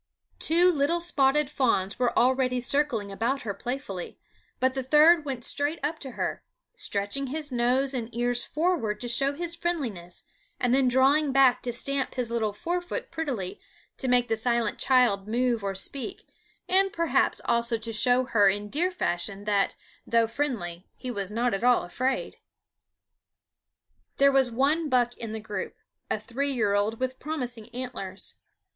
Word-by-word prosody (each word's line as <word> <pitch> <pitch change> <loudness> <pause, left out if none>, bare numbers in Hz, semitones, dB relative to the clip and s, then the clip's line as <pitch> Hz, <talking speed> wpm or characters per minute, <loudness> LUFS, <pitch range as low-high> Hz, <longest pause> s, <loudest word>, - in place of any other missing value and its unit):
Two 345 +3 +4
little 310 +2 +1
spotted 300 -4 +2
fawns 235 -8 0
were 245 -1 +1
already 255 0 +2
circling 245 -6 0
about 235 +7 -1
her 205 - -3
playfully, 220 -4 -5 0.4
but 260 0 +2
the 265 - -2
third 300 +4 +5
went 260 -4 -4
straight 290 +6 -1
up 315 +2 -2
to 265 -3 -7
her, - - -3 0.3
stretching 270 - -1
his 295 +1 -4
nose 250 +3 +1
and 235 -3 -3
ears 245 0 0
forward 300 -11 -1
to 245 - -4
show 275 +4 +2
his 340 +3 -2
friendliness, 265 - -4 0.4
and 245 -1 +2
then 265 -1 +4
drawing 270 +4 +3
back 265 -2 +4
to 245 - -3
stamp 275 +3 -2
his 245 -3 -2
little 225 -3 0
fore 345 - -2
foot 355 +7 -5
prettily 265 - -4 0.4
to 265 - -3
make 245 -1 +3
the 225 - +1
silent 235 +1 0
child 240 -7 +3
move 235 -1 0
or 195 -1 -2
speak, 275 - -4 0.4
and 390 +1 +3
perhaps 335 -1 +1
also 235 0 +1
to 225 0 -5
show 245 +4 +3
her 210 -5 +4
in 205 +1 -2
deer 345 +5 +1
fashion 195 - -2
that, 205 -2 +1 0.3
though 230 0 +3
friendly, 220 -9 -3
he 255 - -6
was 200 -4 -3
not 235 +2 0
at 195 - -2
all 245 0 +4
afraid. 255 +9 -2 1.8
There 280 0 +5
was 270 -2 +3
one 290 +7 +1
buck 245 -2 +2
in 225 -2 -5
the 220 - -4
group, 210 -1 -5 0.3
a - - 0
three 280 +4 -2
year 215 -6 +1
old 205 +2 0
with 260 0 -3
promising 245 -7 -4
antlers. 240 -6 -5
250 Hz, 165 wpm, -27 LUFS, 225-280 Hz, 1.8 s, third